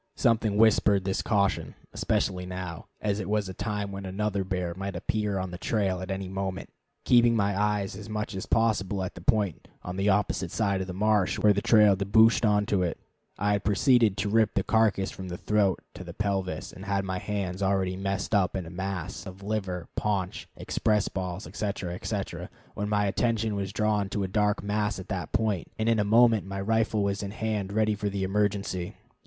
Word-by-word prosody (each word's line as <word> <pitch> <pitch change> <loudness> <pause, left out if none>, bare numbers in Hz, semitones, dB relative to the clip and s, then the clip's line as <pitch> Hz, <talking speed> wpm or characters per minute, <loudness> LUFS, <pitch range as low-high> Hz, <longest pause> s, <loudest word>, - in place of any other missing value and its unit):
Something 110 -3 +2
whispered 105 -3 +4
this 95 -1 0
caution, 100 -2 0 0.2
especially 90 -1 -1
now, 90 -2 -6
as 105 -1 0
it 105 - -4
was 105 -2 +1
a 95 - -6
time 105 0 -3
when 100 0 -6
another 100 +1 -1
bear 90 -2 -2
might 95 +2 -5
appear 105 -2 -1
on 95 -1 -3
the 90 - -7
trail 95 -4 0
at 95 - -6
any 95 0 -3
moment. 95 0 -4 0.3
Keeping 120 -1 +5
my 100 -2 +1
eyes 105 -1 0
as 105 +1 -9
much 105 0 -3
as 95 - -5
possible 100 -4 +1
at 95 - -4
the 85 - -10
point 100 -2 0 0.2
on 90 +1 -5
the 100 +1 +2
opposite 95 -3 +1
side 100 -1 0
of 95 - -4
the 90 - -5
marsh, 105 -1 +2
where 105 -1 +5
the 100 - -1
trail 105 -3 +6
debouched 110 +4 +4
on 105 -1 +3
to 100 -3 +1
it, 85 -2 -1 0.4
I 100 +1 +1
had 100 -1 0
proceeded 110 0 +3
to 100 +1 -1
rip 110 0 +2
the - - +2
carcass 110 -4 +2
from 95 - -8
the 90 -1 -5
throat 100 -3 +1
to - - -8
the 85 -1 -9
pelvis, 95 -6 -2
and 95 +2 -10
had 100 -1 0
my 95 -1 -2
hands 95 -2 -3
already 95 -1 +1
messed 95 +2 -2
up 95 -4 +2
in 95 -2 -3
a 80 - -9
mass 95 +1 -4
of 95 +1 -10
liver, 95 -5 -3
paunch, 100 -4 -2
express 105 -2 0
balls, 95 +1 -4
etc., 100 -4 -3
etc., 90 - -4 0.2
when 105 0 -3
my 105 -1 +2
attention 110 +1 0
was 100 -2 -3
drawn 105 -1 0
to 100 0 -2
a - - -1
dark 105 +2 +1
mass 105 0 -1
at 95 0 -9
that 90 -7 -3
point, 105 -6 0
and 110 - -1
in 115 -1 +3
a - - +3
moment 115 0 +5
my 100 0 -4
rifle 110 0 +1
was 100 -1 -1
in 100 - -4
hand 105 -2 -2
ready 110 +1 +2
for 105 0 -2
the 100 -1 -2
emergency. 100 -2 -1
100 Hz, 205 wpm, -27 LUFS, 95-105 Hz, 0.4 s, trail